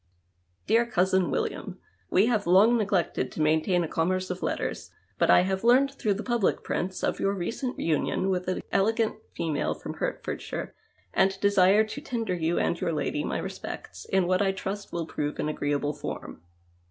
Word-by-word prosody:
Dear 235 +1 +3
Cousin 185 -3 +2
William, - - -3
— 90 0 -39
We 195 - +6
have 220 -5 +1
long 200 +7 +6
neg 215 -4 0
lected 170 -8 0
to - - -7
maintain 160 +4 +2
a - - -2
commerce 185 +4 0
of 180 - -5
letters, - - -3 0.3
but - - +3
I - - +7
have 190 +2 -1
learned 260 +4 +5
through 215 -7 0
the 210 - -5
public 240 -5 0
jirints 185 +1 -2
of - - -2
your 195 0 +1
recent 230 +8 -3
union 165 +4 0
with 180 -1 -2
an 185 - -2
elegant 220 +3 +1 0.2
female 155 -3 -1
from - - -7
Hertfordshire - - -4 0.4
and 190 0 +2
desire 200 +1 +5
to 220 +6 -6
tender 230 -8 -2
you 170 -1 0
and 170 - 0
your 165 - 0
lady 150 -1 -1
my - - -2
respects - - -7
in 190 -2 +2
what 185 +2 +2
I 195 -1 +2
trust 200 +1 -5
will 170 -1 -2
prove 150 -2 -3
an - - -1
agreeable 145 -1 -1
form. 140 - -7
190 Hz, 185 wpm, -27 LUFS, 170-210 Hz, 0.4 s, I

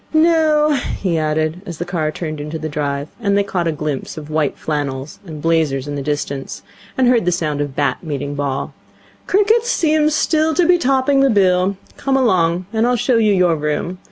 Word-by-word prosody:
No,' 315 -2 +4 0.3
he 175 -4 0
added, 155 +2 -1
as 170 -3 -6
the 175 - -4
car 170 -4 -1
turned 155 -2 -5
into 150 +2 -5
the 155 0 -4
drive, 145 -1 -3
and 200 -2 +1
they 200 - +3
caught 180 -4 -2
a - - +1
glimpse 150 -2 -4
of 155 0 -8
white 155 -2 0
flannels 145 -2 -4
and 155 -2 -8
blazers 155 -5 +1
in 145 - -4
the 145 - -3
distance, 140 -1 -4 0.3
and 260 -1 +3
heard 245 -2 +4
the 180 - +2
sound 155 -4 -1
of 145 -2 -4
bat 145 - 0
meeting 145 -3 -4
ball, 140 -2 -3 0.5
'cricket 420 +4 +3
seems 310 -9 +2
still 315 0 +1
to 355 - +3
be 355 +1 +4
topping 270 -1 +2
the 275 0 +4
bill. 190 -2 +2 0.2
Come 270 -1 0
along, 180 -8 +2
and 225 +1 +2
I'll 250 - +2
show 245 +1 +1
you 215 -2 +3
your 180 -4 +3
room. 150 +4 -3
170 Hz, 200 wpm, -18 LUFS, -, 0.5 s, No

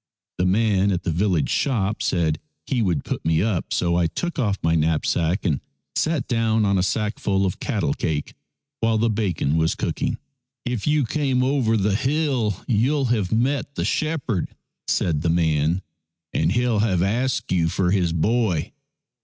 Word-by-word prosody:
The 90 - +2
man 100 0 +2
at 90 -1 -1
the 85 - -1
village 90 -2 +1
shop 110 -7 0
said 80 -4 0 0.3
he 125 -3 0
would 85 -9 0
put - - -4
me 80 +1 +2
up, 105 -6 -1
so 85 -1 +1
I 85 -1 +3
took 175 - -4
off 105 -6 +1
my 80 0 +2
knapsack 80 +3 +1
and 75 -7 +1 0.3
sat 155 - 0
down 115 -3 +1
on 100 -1 +2
a - - +3
sackful 100 -1 0
of 90 - -2
cattle - - -1
cake 75 -2 -3 0.5
while 115 -1 +2
the 115 +1 +2
bacon 90 -8 0
was 80 0 +1
cooking. - - -2 0.3
" 130 0 -63
If 125 -2 -2
you 150 -2 +3
came 130 -1 0
over 130 -4 +2
the 100 0 +1
hill, 130 - 0
you'll 130 +5 +2
have 100 -6 -1
met 125 +4 +1 0.2
shepherd," 140 - -1 0.4
said 75 -4 +1
the 85 - 0
man, 80 +1 +1 0.2
" 80 -1 -63
and - - +1
he'll 120 -1 +1
have 95 -5 +2
asked 120 +6 -1
you 85 -3 +2
for 90 +1 0
his 90 -4 +2
boy." 95 0 0
100 Hz, 170 wpm, -23 LUFS, 85-120 Hz, 0.5 s, I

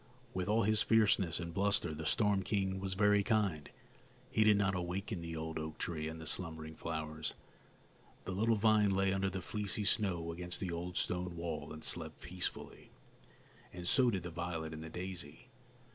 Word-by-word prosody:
With 95 +1 -2
all 110 +1 +4
his 110 +1 +3
fierceness 105 -7 +4
and 85 -1 -5
bluster, 100 -4 +2
the 80 0 -4
storm 105 0 +3
king 95 -1 0
was 95 -1 -3
very 105 0 +5
kind; 100 -8 +1 0.6
he 110 - +4
did 105 -1 +6
not 95 -1 +2
awaken 90 +2 -3
the 85 0 -5
old 80 0 -3
oak 80 0 -5
tree 80 -2 -2
and 80 +1 -6
the 80 - -8
slumbering 80 -2 -1
flowers. 80 -2 -4 0.9
The - - -3
little 110 +5 +2
vine 105 -1 +4
lay 95 0 +2
under 95 0 +1
the 95 -1 -5
fleecy 105 +1 0
snow 90 -6 +1
against 90 +1 -4
the 95 -3 -2
old 85 +1 -4
stone 90 -1 -1
wall 85 0 -4
and 80 - -8
slept - - -1
peacefully, 90 -1 -6 0.8
and 90 -1 -7
so 130 +3 +5
did 95 -6 -1
the 90 - -5
violet 80 -2 -3
and 80 0 -6
the 80 - -7
daisy. 90 - -6
90 Hz, 180 wpm, -35 LUFS, 80-100 Hz, 0.9 s, did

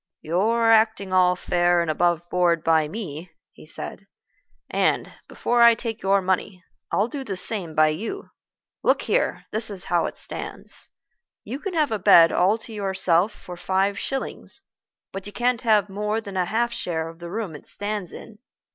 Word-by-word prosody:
"You're 225 +8 +2
acting 220 -4 +3
all 180 -1 +4
fair 175 0 +2
and 170 -2 0
aboveboard 175 0 +1
by 160 -2 +3
me," 175 -3 -7 0.2
he - - -16
said, 195 +4 -8 0.6
"and, - - 0
before 240 0 0
I 235 -1 +8
take 225 -1 -5
your 195 0 +2
money, 185 0 -2 0.3
I'll 205 - +2
do 275 +2 -6
the 205 -7 -4
same 185 -4 +2
by 155 0 +5
you. 225 - -5 0.5
Look - - +2
here; - - 0
this 220 +1 -2
is 195 -3 -7
how 170 - +3
it - - -8
stands. - - -4 0.5
You 250 +7 -6
can 370 +2 -5
have 305 -5 +2
a 215 - -1
bed 165 -2 +7
all 190 +5 +3
to 225 0 -9
yourself 190 -2 +1
for 180 -3 -11
five 195 +3 0
shillings, 270 -1 -4 0.5
but 195 +1 -6
you - - -8
can't 245 -1 0
have 215 -4 +3
more 210 +2 -2
than 200 -3 -9
a 185 -1 +1
half 235 +5 0
share 160 -6 -3
of 165 0 -11
the 170 0 -8
room 200 -4 -4
it 150 - -12
stands 205 -3 -2
in. 215 -1 -11
195 Hz, 175 wpm, -24 LUFS, 175-225 Hz, 0.6 s, I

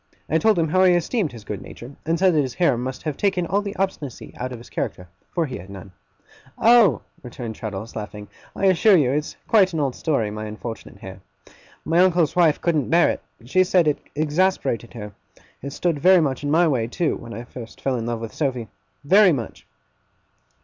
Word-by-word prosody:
I 160 - +1
told 220 0 +3
him 165 -2 +1
how 185 +4 +3
I 185 -1 +6
esteemed 175 - 0
his 115 -3 -11
good 105 -2 -6
nature; 125 +4 -11
and 165 +1 +1
said 185 +1 +3
that 155 - +3
his 130 -3 -4
hair 170 -8 +3
must 130 +2 -5
have 155 -3 -3
taken 190 -1 0
all 200 +4 0
the 205 0 -6
obstinacy 185 -9 -4
out 125 +1 -5
of 125 - -6
his 115 - -14
character, 90 - -4 0.2
for 170 -2 -1
he 130 - -6
had 95 - -12
none. 100 -1 -10 0.7
'Oh!' 230 -3 +5 0.2
returned 120 -2 -7
Traddles, 110 0 -7
laughing. 105 -1 -7 0.3
'I 195 - -1
assure 190 +2 +5
you, 135 -6 +2
it's 150 +2 -2
quite 195 -5 +4
an 160 - -1
old 140 -3 0
story, 125 -10 -1
my 105 +1 -5
unfortunate 110 0 -8
hair. 95 -1 -10 0.6
My 165 +2 +2
uncle's 175 -4 +3
wife 165 -4 +4
couldn't 155 -6 0
bear 170 +1 +4
it. - - -6 0.2
She 185 +9 +3
said 180 -3 +2
it 150 - +1 0.2
exasperated 155 -6 0
her. 105 -2 -8 0.5
It 140 - -6
stood 165 +1 -1
very 185 +3 +6
much 140 -4 -1
in 145 - -2
my 165 +3 +4
way, 125 -7 0
too, 160 +7 -1
when 115 0 -9
I 115 - -6
first 120 -2 -11
fell 135 -1 -1
in 115 -1 -3
love 120 -1 -3
with 115 - -6
Sophy. 125 -7 -2 0.4
Very 195 +4 +6
much! 125 -7 -5
145 Hz, 210 wpm, -22 LUFS, 120-175 Hz, 0.7 s, I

